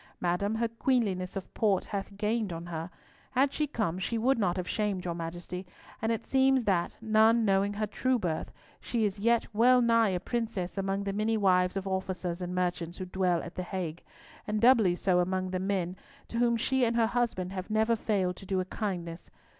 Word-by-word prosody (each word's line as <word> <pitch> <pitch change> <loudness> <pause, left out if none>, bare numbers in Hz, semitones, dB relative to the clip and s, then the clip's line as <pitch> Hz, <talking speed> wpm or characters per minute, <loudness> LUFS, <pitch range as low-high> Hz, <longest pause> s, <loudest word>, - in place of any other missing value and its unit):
Madam, 180 +5 0
her 230 +1 +1
queenliness 225 -6 0
of 195 - -6
port 200 -4 +1
hath 200 0 -5
gained 215 -1 0
on 165 0 -5
her. 165 0 -5 0.4
Had 270 +2 +3
she 300 - 0
come, 210 - -2
she 230 +5 -1
would 245 +2 +2
not 185 -3 +1
have 180 -1 -3
shamed 205 -4 -1
your 175 - -1
Majesty; 175 +2 -5 0.4
and 225 +1 +1
it 225 - -2
seems 265 -1 +3
that, 180 -5 0
none 220 +1 +4
knowing 195 0 +2
her 215 +1 -1
true 255 +5 0
birth, 170 -7 -3 0.3
she 230 -3 -1
is 200 0 -2
yet 235 +2 +3
well 250 +4 +5
nigh 230 -2 +4
a 180 -2 -1
princess 225 -5 -3
among 195 0 -1
the 200 0 -2
many 215 +2 +1
wives 185 -2 +3
of 195 - -3
officers 185 -2 -3
and 180 0 -4
merchants 175 -1 -2
who 185 - -4
dwell 180 -2 0
at 175 - -8
the - - -4
Hague, 175 -3 -4 0.5
and 215 0 0
doubly 225 -6 +5
so 180 0 +2
among 185 +1 0
the 185 - -1
men, 185 -2 -1 0.3
to 230 - -2
whom 235 -1 +3
she 265 +3 +1
and 230 -1 +2
her 230 -1 +4
husband 220 -6 -1
have 185 +1 -5
never 220 +2 +2
failed 195 -5 0
to - - -11
do 190 -1 0
a 185 - -1
kindness. 180 -4 -4
195 Hz, 205 wpm, -29 LUFS, 180-225 Hz, 0.5 s, well